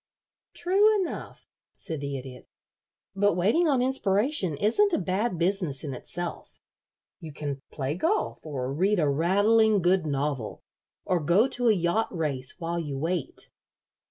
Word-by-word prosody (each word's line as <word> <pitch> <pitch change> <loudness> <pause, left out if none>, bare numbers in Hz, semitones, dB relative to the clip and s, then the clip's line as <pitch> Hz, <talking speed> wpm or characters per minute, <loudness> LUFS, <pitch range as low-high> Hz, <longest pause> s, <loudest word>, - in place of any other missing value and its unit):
"True 410 +4 +3
enough," 365 -4 -5 0.3
said 160 -3 -5
the 140 -1 -3
Idiot; 130 -1 -10 0.7
"but 205 -2 +2
waiting 220 - +2
on 265 -4 +2
inspiration 210 - +1
isn't 395 - +3
a - - +3
bad 190 +2 -1
business 175 -5 0
in 145 -3 -4
itself. 175 +7 -6 0.6
You 160 -4 -8
can 140 -2 -5
play 140 -1 -2
golf 330 - -1
or 135 -4 -4
read 195 +7 +2
a 155 - +2
rattling 205 +8 +3
good 180 -2 +2
novel, 140 -5 -3 0.4
or 180 - +1
go 175 - +3
to 245 -1 0
a - - +6
yacht 180 +4 0
race 145 -7 -2
while 170 -1 -3
you 145 -4 -4
wait." 165 +1 -3
175 Hz, 145 wpm, -27 LUFS, 150-215 Hz, 0.7 s, a